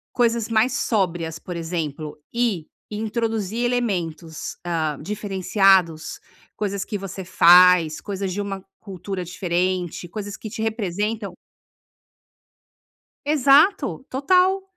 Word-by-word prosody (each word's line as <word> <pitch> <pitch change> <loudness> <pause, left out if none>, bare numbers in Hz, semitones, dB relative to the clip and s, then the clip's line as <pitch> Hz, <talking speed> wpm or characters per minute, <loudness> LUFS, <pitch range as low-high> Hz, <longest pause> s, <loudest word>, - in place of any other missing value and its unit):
coisas 235 -2 +1
mais 225 +2 +2
sóbrias, 175 -7 -1
por 175 +2 -7
exemplo, 160 -3 -4
e 230 -9 0 0.2
introduzir 220 0 -2
elementos, 175 -10 -2
ah, 160 -4 -1
diferenciados, 190 -3 +1 0.4
coisas 200 -2 -2
que 210 - -4
você 195 -1 -7
faz, 175 -2 +6
coisas 195 -2 -4
de 200 - -3
uma 195 -1 -5 0.2
cultura 190 -2 -6
diferente, 180 0 -2
coisas 205 +2 -6
que 220 - -8
te 220 +1 -5
representam 210 -1 -2 1.9
Exato, 290 +1 +3
total. 365 +8 +2
195 Hz, 100 wpm, -23 LUFS, 175-225 Hz, 1.9 s, faz